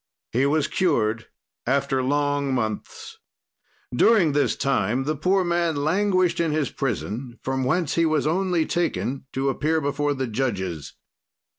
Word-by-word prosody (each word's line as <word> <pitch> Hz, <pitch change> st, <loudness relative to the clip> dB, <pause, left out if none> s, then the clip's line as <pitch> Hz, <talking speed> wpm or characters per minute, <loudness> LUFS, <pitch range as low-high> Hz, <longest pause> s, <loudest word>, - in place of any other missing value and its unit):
"He 130 Hz, +4 st, +2 dB
was 145 Hz, 0 st, +1 dB
cured 115 Hz, -, 0 dB, 0.4 s
after 135 Hz, 0 st, +1 dB
long 145 Hz, 0 st, 0 dB
months. 110 Hz, -4 st, -4 dB, 0.8 s
"During 185 Hz, -, +4 dB
this 145 Hz, 0 st, +1 dB
time 130 Hz, -2 st, 0 dB
the 155 Hz, +3 st, -1 dB
poor 185 Hz, +6 st, +2 dB
man 170 Hz, -2 st, 0 dB
languished 185 Hz, +4 st, +1 dB
in 165 Hz, -2 st, +1 dB
his 150 Hz, -1 st, -1 dB
prison, 120 Hz, -1 st, -3 dB
from 130 Hz, 0 st, -1 dB
whence 165 Hz, +4 st, 0 dB
he 165 Hz, -1 st, +2 dB
was 155 Hz, -2 st, +1 dB
only 175 Hz, 0 st, +1 dB
taken 140 Hz, -6 st, -2 dB
to 135 Hz, +1 st, 0 dB
appear 155 Hz, +4 st, 0 dB
before 145 Hz, 0 st, -1 dB
the 130 Hz, -1 st, -2 dB
judges. 100 Hz, -, -3 dB
145 Hz, 140 wpm, -24 LUFS, 130-165 Hz, 0.8 s, During